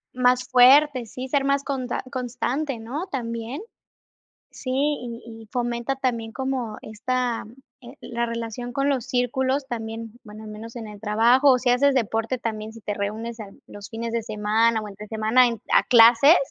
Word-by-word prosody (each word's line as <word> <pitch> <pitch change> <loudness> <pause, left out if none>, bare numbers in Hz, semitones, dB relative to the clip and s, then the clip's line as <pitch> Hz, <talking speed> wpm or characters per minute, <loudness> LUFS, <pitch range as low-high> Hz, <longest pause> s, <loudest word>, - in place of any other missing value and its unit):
Más 250 0 +2
fuerte, 260 +1 +6
sí, 255 +4 -7
ser 275 +1 +1
más 280 0 +1
conta 260 -3 -3
constante, 255 +2 -2
¿no? 275 - -5
También. 235 - -4 0.9
Si, 255 - -7
y 260 -4 -1
y 225 -1 -11
fomenta 240 +1 -1
también 235 -4 -2
como 260 -5 -3
esta, 240 +2 -2 0.4
eh, 250 +1 -12
la 235 0 -3
relación 230 +1 -5
con 275 0 0
los 260 -3 -1
círculos 260 +2 0
también, 225 -1 -6
bueno, 215 0 -11
al 215 - -9
menos 220 +2 -9
en 225 -2 -6
el 210 -1 -11
trabajo, 235 +6 +4
o 250 - +3
si 245 - +2
haces 275 +3 +3
deporte 225 +1 0
también 220 -2 -4
si 230 - -12
te 210 - -4
reúnes 220 +3 -4
en 205 -3 -11
los 205 -1 -10
fines 230 0 -4
de 230 -1 -1
semana 220 +1 +1
o 210 - -7
entre 205 +1 -10
semana 220 +4 +3
en 230 -2 -3
a - - +6
clases. 240 +7 +7
235 Hz, 175 wpm, -24 LUFS, 225-255 Hz, 0.9 s, clases